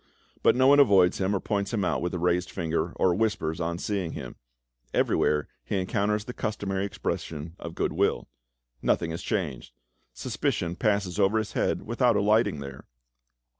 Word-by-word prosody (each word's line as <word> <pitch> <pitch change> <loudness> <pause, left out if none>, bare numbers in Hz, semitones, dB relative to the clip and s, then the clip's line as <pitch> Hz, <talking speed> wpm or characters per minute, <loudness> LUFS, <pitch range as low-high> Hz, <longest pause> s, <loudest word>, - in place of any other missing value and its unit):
But - - +5
no 130 +1 +4
one 140 +2 +7
avoids 95 -9 +5
him, 95 +1 +1
or - - 0
points 100 -1 -2
him 100 -4 0
out - - 0
with 90 - -1
a - - -1
raised 90 +1 +1
finger, 85 -1 -2
or 90 - +3
whispers 95 -5 -1
on 85 0 -1
seeing 95 -3 -2
him; - - -7 0.6
everywhere 75 -1 +2 0.2
he - - -2
encounters 105 +2 0
the 125 - -6
customary 100 -4 -2
expression 80 -4 -4
of 85 -1 -7
goodwill. - - 0 0.5
Nothing 80 - +1
has 85 - -5
changed; 75 - -3 0.4
suspicion 85 +7 -2
passes 100 -2 0
over 100 +2 +3
his 110 -2 -2
head - - 0
without 120 +1 +2
alighting 105 -6 +2
there. 70 -2 -9
95 Hz, 165 wpm, -27 LUFS, 85-105 Hz, 0.6 s, one